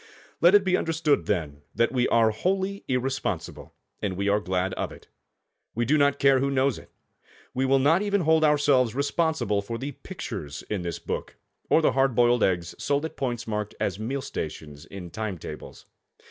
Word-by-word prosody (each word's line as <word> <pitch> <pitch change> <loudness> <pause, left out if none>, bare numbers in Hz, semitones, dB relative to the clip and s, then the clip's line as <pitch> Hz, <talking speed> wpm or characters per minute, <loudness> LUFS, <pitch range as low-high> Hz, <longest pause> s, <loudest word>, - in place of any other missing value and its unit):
Let 175 +4 +7
it 205 - +6
be 185 -1 +2
understood, 160 - +1
then, 75 -8 -2
that 115 - +2
we 125 -1 +1
are 115 -1 +4
wholly 190 - -1
irresponsible, 125 -8 -2 0.3
and 95 -3 -2
we 100 +1 -1
are 105 +1 +3
glad 95 -1 -1
of - - -3
it. - - -14 0.7
We 120 +1 0
do 145 +6 +3
not 140 -1 +3
care 135 -1 +4
who 140 +1 +1
knows 135 -2 +1
it. - - -16 0.6
We 130 +1 0
will 135 +1 +4
not 155 +7 +3
even 205 -1 +1
hold 160 -1 +3
ourselves 145 -5 +3
responsible 140 -7 0
for 115 +3 -5
the 140 +4 -4
pictures 110 - -7
in 105 -3 -1
this 85 -2 -4
book, - - -5 0.3
or 160 - +4
the - - +4
hard 135 -2 +2
boiled 120 0 +4
eggs 85 -2 0
sold 145 +2 0
at 160 - -6
points 120 -3 -3
marked 105 -1 -3
as - - -1
meal 130 +5 -3
stations 75 -1 -6
in 90 -3 -9
time 110 -4 -4
tables. - - -9
125 Hz, 190 wpm, -26 LUFS, 100-145 Hz, 0.7 s, Let